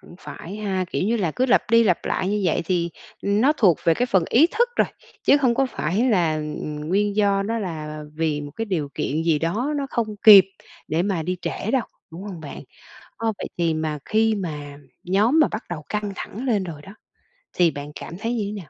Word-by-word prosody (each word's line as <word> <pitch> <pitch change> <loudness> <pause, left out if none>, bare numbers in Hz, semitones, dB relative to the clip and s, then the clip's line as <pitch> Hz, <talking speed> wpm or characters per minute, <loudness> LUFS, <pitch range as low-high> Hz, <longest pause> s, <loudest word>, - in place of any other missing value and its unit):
cũng - - -15
phải 190 +5 -9
ha, 195 -3 -2
kiểu - - -1
như 225 +4 +1
là 185 -7 0
cứ 255 - 0
lặp 250 - +4
đi 230 0 +6
lặp 180 -5 +1
lại 185 - -1
như 210 +1 0
vậy 170 -1 +1
thì, 170 -1 0 0.3
ừm, 200 +1 +1
nó 275 +5 +5
thuộc 185 - +4
về 165 - +4
cái 245 - 0
phần 190 -7 +2
ý 280 +8 +6
thức 480 +7 +1
rồi, - - +3 0.4
chứ - - +5
không 255 -4 +2
có 270 +2 +2
phải 215 +2 -1
là, 175 -7 +2
ừm, 150 0 -5
nguyên 205 +3 +1
do 200 -1 +2
nó 225 +3 -2
là 155 -6 -5
vì 155 -2 -1
một 145 0 -7
cái 225 - -2
điều 175 -9 -2
kiện 155 +3 -1
gì 165 -2 +2
đó 215 - -1
nó 280 -1 -2
không 220 -3 -2
kịp 200 -4 +10 0.4
để 160 +1 +1
mà 190 -4 -1
đi 180 +3 -2
trễ 220 - -3
đâu, 265 -2 +2 0.3
đúng 170 +3 -8
hông 195 -5 -7
bạn? 150 -3 -8 0.5
Ờ, 225 -1 -1
vậy - - -4
thì 165 -2 +1
mà 155 -1 -2
khi 220 0 +2
mà 150 -7 -5 0.3
nhóm 210 - +3
mà 310 - +5
bắt 215 - -5
đầu 160 -3 -4
căng 210 -1 -2
thẳng 230 +6 -6
lên 210 -6 +1
rồi 160 -5 -8
đó, 195 +6 -12 0.6
thì 175 -2 +3
bạn 145 +1 -7
cảm - - -8
thấy 230 +3 -2
như 230 -3 -1
thế 200 - -4
nào? - - -6
195 Hz, 235 wpm, -23 LUFS, 160-220 Hz, 0.6 s, kịp